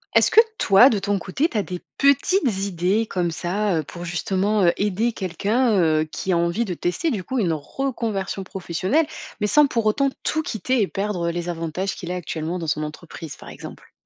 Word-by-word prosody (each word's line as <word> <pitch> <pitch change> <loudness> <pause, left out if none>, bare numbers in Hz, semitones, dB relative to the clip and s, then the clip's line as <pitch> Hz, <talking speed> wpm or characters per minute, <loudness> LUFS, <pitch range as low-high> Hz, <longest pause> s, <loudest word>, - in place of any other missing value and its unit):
Est-ce - - +5
que 450 - +9 0.2
toi 205 +6 +7
de 220 - +1
ton 200 0 0
côté, 265 - 0
tu 225 - -3
as - - +3
des 180 -2 -6 0.2
petites 280 - +3
idées 190 +4 0
comme 180 -5 -1
ça, 180 +5 -1
heu, 155 - -1
pour 175 +4 -8
justement, 190 +4 0
heu, 170 - +5
aider 210 +4 0
quelqu'un, 210 +5 +1
heu, 155 -3 +3
qui 190 - -3
a - - +3
envie 170 +7 +1
de 185 - -3
tester 180 - -1
du 200 -6 -2
coup 260 - -3
une 180 -8 +1
reconversion 205 - -3
professionnelle 190 - 0 0.3
mais 210 - 0
sans 295 +6 +5
pour 230 -4 -1
autant 275 +6 +2
tout 315 - 0
quitter 255 -2 -1
et 200 - +2
perdre, 195 -4 -2
heu, - - 0
les 175 0 -4
avantages 170 +3 -3
qu'il 175 -1 -6
a - - -2
actuellement 165 0 -3
dans 170 - -4
son 150 0 0
entreprise, 155 0 -8
par - - -12
exemple? - - -11
195 Hz, 210 wpm, -23 LUFS, 175-225 Hz, 0.3 s, que